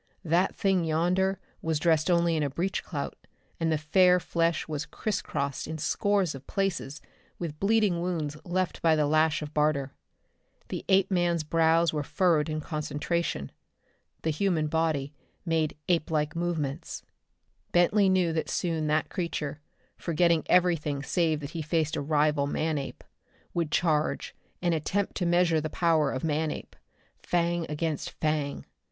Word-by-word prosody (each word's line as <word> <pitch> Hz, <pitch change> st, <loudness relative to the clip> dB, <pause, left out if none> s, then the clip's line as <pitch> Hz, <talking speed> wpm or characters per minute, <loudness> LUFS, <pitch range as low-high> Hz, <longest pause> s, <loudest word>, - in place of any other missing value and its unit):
That 175 Hz, +4 st, +2 dB
thing 190 Hz, -3 st, +2 dB
yonder 180 Hz, +4 st, +1 dB, 0.2 s
was 160 Hz, -1 st, 0 dB
dressed 160 Hz, +1 st, +2 dB
only 170 Hz, -1 st, +3 dB
in 155 Hz, -, 0 dB
a 145 Hz, -, 0 dB
breech 175 Hz, +8 st, -2 dB
clout, -, -, -4 dB, 0.4 s
and 165 Hz, -1 st, +1 dB
the 155 Hz, -, +2 dB
fair 180 Hz, +4 st, +4 dB
flesh 170 Hz, -1 st, 0 dB
was 150 Hz, -1 st, -4 dB
criss 210 Hz, -2 st, -2 dB
crossed 140 Hz, -1 st, -3 dB
in 160 Hz, +1 st, -4 dB
scores 195 Hz, +2 st, +1 dB
of 135 Hz, 0 st, -11 dB
places 180 Hz, -7 st, -2 dB, 0.3 s
with 155 Hz, -3 st, -5 dB
bleeding 205 Hz, -4 st, +2 dB
wounds 165 Hz, -5 st, -2 dB
left 185 Hz, 0 st, -2 dB
by 165 Hz, -1 st, +4 dB
the 150 Hz, -1 st, +2 dB
lash 155 Hz, +1 st, +2 dB
of 150 Hz, 0 st, -8 dB
Barter. 150 Hz, -3 st, +1 dB, 0.8 s
The -, -, -4 dB
Apeman's 180 Hz, -4 st, +3 dB
brows 165 Hz, +1 st, +3 dB
were 150 Hz, -, 0 dB
furrowed 160 Hz, 0 st, +2 dB
in 155 Hz, 0 st, -2 dB
concentration. 150 Hz, -, -2 dB, 0.7 s
The 160 Hz, -, +1 dB
human 165 Hz, -1 st, +1 dB
body 155 Hz, -3 st, 0 dB, 0.3 s
made 160 Hz, -3 st, 0 dB
ape 170 Hz, -3 st, +1 dB
like 150 Hz, -1 st, 0 dB
movements. 165 Hz, -5 st, -3 dB, 0.7 s
Bentley 190 Hz, +3 st, +4 dB
knew 180 Hz, -3 st, +2 dB
that 160 Hz, -, -2 dB
soon 165 Hz, -3 st, -1 dB
that 155 Hz, +1 st, +1 dB
creature, 155 Hz, -5 st, -3 dB, 0.4 s
forgetting 170 Hz, -1 st, +2 dB
everything 165 Hz, -6 st, +2 dB
save 160 Hz, -2 st, +1 dB
that 140 Hz, +1 st, -6 dB
he 165 Hz, -, -4 dB
faced 155 Hz, 0 st, 0 dB
a -, -, -2 dB
rival 150 Hz, -1 st, +2 dB
man 155 Hz, +1 st, -1 dB
ape, 135 Hz, -, -7 dB, 0.5 s
would 170 Hz, -3 st, 0 dB
charge 155 Hz, -1 st, 0 dB, 0.3 s
and 175 Hz, -1 st, +2 dB
attempt 190 Hz, +6 st, -1 dB
to 180 Hz, -, 0 dB
measure 170 Hz, -2 st, +3 dB
the 155 Hz, -, -3 dB
power 160 Hz, -5 st, +2 dB
of 130 Hz, -, -4 dB
Manape 155 Hz, 0 st, -2 dB, 0.5 s
fang 170 Hz, -1 st, 0 dB
against 150 Hz, 0 st, -2 dB
fang. 150 Hz, -2 st, -2 dB
160 Hz, 150 wpm, -28 LUFS, 150-175 Hz, 0.8 s, fair